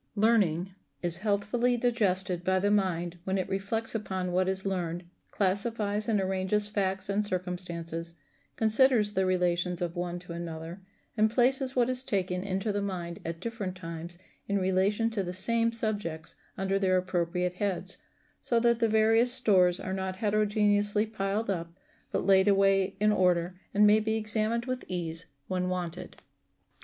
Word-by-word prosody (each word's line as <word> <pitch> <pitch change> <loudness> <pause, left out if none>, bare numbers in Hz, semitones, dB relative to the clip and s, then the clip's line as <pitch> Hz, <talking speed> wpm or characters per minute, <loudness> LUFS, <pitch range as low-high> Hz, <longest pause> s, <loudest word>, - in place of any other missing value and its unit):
Learning 195 -5 +2 0.3
is 175 0 -1
healthfully 215 +4 +1
digested 190 -7 0
by 185 +1 +2
the 200 +2 +1
mind 175 -4 0
when 190 +1 -1
it 185 - -1
reflects 200 +4 -2
upon 190 -4 -3
what 185 +1 +1
is 190 0 -3
learned, 175 -2 -2 0.3
classifies 205 +2 -1
and 215 -2 +2
arranges 190 +2 0
facts 195 -2 -1
and 200 +1 +1
circumstances, 175 -3 -4 0.4
considers 220 -1 +4
the 190 -1 +1
relations 180 -1 0
of 175 -1 -3
one 175 0 -3
to 175 -1 -9
another, 170 +1 -6 0.3
and 215 -1 +3
places 260 +3 +1
what 245 -2 +3
is 255 0 +1
taken 185 -6 -1
into 195 +2 -1
the 205 0 -1
mind 175 -4 -4
at 165 0 -5
different 205 -3 -4
times 170 -1 -7 0.3
in 200 - +1
relation 195 +4 +1
to 215 -3 -1
the 180 -1 -4
same 230 +5 +2
subjects 205 -8 -3 0.2
under 195 0 0
their 185 -1 +3
appropriate 180 -1 -1
heads, 190 0 -2 0.4
so 235 - +1
that 235 0 +3
the 230 -1 +2
various 225 +3 +4
stores 185 -7 +4
are 190 - -4
not 190 -1 -3
heterogeneously 210 0 +2
piled 215 0 -2
up, 170 -4 -3 0.4
but - - -1
laid 190 0 +5
away 195 -1 +3
in 210 +1 +4
order, 180 -3 +2 0.2
and 210 +1 +4
may 210 +1 +6
be 220 0 -1
examined 220 +2 -1
with 255 -1 -3
ease 170 -2 -4 0.2
when 180 -1 -1
wanted. 180 0 -4
195 Hz, 160 wpm, -29 LUFS, 180-215 Hz, 0.4 s, may